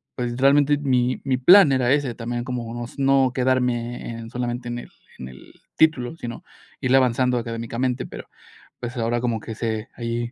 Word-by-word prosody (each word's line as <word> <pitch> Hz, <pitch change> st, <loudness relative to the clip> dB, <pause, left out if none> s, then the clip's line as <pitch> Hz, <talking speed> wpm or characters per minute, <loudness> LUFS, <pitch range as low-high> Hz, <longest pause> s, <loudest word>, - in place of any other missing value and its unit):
pues, 120 Hz, -1 st, -3 dB
realmente 145 Hz, +2 st, +4 dB
mi 130 Hz, -3 st, +1 dB
mi 130 Hz, -2 st, +1 dB
plan 175 Hz, +3 st, +7 dB
era 125 Hz, -1 st, +2 dB
ese, 140 Hz, -5 st, +1 dB
también 120 Hz, 0 st, -4 dB
como 120 Hz, -1 st, -4 dB
s -, -, -13 dB
no 135 Hz, -1 st, +4 dB
no 130 Hz, -, -2 dB
quedarme 125 Hz, -2 st, -1 dB
en 115 Hz, 0 st, -8 dB
solamente 120 Hz, 0 st, -4 dB
en 120 Hz, 0 st, -4 dB
el -, -, -11 dB, 0.3 s
en 65 Hz, -, -8 dB
el 65 Hz, +1 st, -14 dB, 0.2 s
título, 155 Hz, -4 st, +2 dB
sino 120 Hz, -7 st, -7 dB, 0.4 s
irle 130 Hz, +1 st, +2 dB
avanzando 125 Hz, 0 st, +2 dB
académicamente. 115 Hz, +2 st, -3 dB
Pero, -, -, -10 dB, 0.5 s
pues 120 Hz, +1 st, -6 dB
ahora 120 Hz, +1 st, 0 dB
como 120 Hz, -2 st, -1 dB
que 115 Hz, -, -7 dB
se 110 Hz, -1 st, -3 dB
ahí, 120 Hz, 0 st, -3 dB
120 Hz, 180 wpm, -23 LUFS, 120-130 Hz, 0.5 s, plan